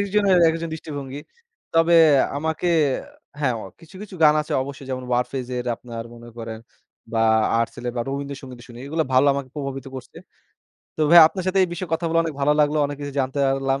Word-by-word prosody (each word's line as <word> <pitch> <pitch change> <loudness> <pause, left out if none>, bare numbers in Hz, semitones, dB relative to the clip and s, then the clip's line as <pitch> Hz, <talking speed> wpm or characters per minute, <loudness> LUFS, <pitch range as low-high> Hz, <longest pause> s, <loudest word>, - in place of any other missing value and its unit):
একজনের, 200 -1 +2
একজনের 165 0 -3
দৃষ্টিভঙ্গি। 145 -3 -7 0.5
তবে 165 +1 +4 0.4
আমাকে 160 +3 -2 0.7
হ্যাঁ, 130 -4 +1 0.3
কিছু, 165 +3 -17
কিছু 205 -2 -10
গান 150 0 +6
আছে - - -7
অবশ্যই, 140 0 -9
যেমন 130 -1 -4
ওয়ারফেজের, 125 0 -2
আপনার 115 -1 -8
মনে 120 0 -13
করেন, 115 -1 -6 0.5
বা 115 - 0 0.4
আর্টসেল 120 +1 -4
বা - - 0
রবীন্দ্রসঙ্গীত 135 -2 -6
শুনি। 120 0 -12
এগুলা 160 +2 -1
ভালো, 130 +3 +5
আমাকে 140 -2 -4
প্রভাবিত 135 -2 -5
করছে। 130 - -11 0.8
তো - - -5
ভাইয়া, 170 0 +10
আপনার 185 0 -6
সাথে 190 +1 +1
এই - - -5
বিষয়ে 175 -1 -6
কথা 165 +1 -1
বলা 165 0 +2
অনেক 160 -3 -4
ভালো 145 +2 +3
লাগলো। 150 +1 +2
অনেক 145 0 -6
কিছু 145 -1 -5
জানতে 130 +2 -3
পারলাম। 135 0 0
140 Hz, 180 wpm, -22 LUFS, 130-160 Hz, 0.8 s, ভাইয়া